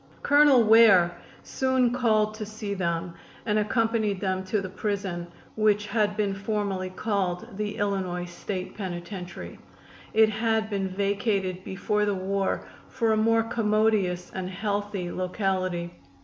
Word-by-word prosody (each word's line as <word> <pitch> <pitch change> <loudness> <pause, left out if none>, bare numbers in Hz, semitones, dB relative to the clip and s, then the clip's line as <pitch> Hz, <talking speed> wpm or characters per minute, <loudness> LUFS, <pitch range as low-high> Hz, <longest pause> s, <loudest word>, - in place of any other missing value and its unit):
Colonel 285 -4 +6
Ware 210 -6 +6 0.3
soon 260 -2 +1
called 215 -4 +2
to 215 0 -6
see 215 -1 -5
them 170 -2 -2 0.3
and 215 -1 +2
accompanied 215 -2 0
them 190 -1 -1
to 205 +3 0
the 195 - -4
prison, 190 -3 -3 0.3
which 210 -1 +2
had 210 -1 0
been 205 -2 0
formerly 195 -2 -2
called 195 +1 -2
the 210 0 -3
Illinois 190 -3 -1
State 185 +1 -6
Penitentiary. 180 -1 -7 0.6
It 220 0 +6
had 220 0 0
been 195 -1 -1
vacated 195 -1 -1
before 210 +2 -1
the 205 -1 0
war 195 +1 -1 0.2
for 230 -3 0
a - - +3
more 225 +1 +3
commodious 215 -5 +1
and 185 -1 -4
healthy 200 -1 -3
locality. 185 -2 -2
205 Hz, 135 wpm, -26 LUFS, 185-215 Hz, 0.6 s, Colonel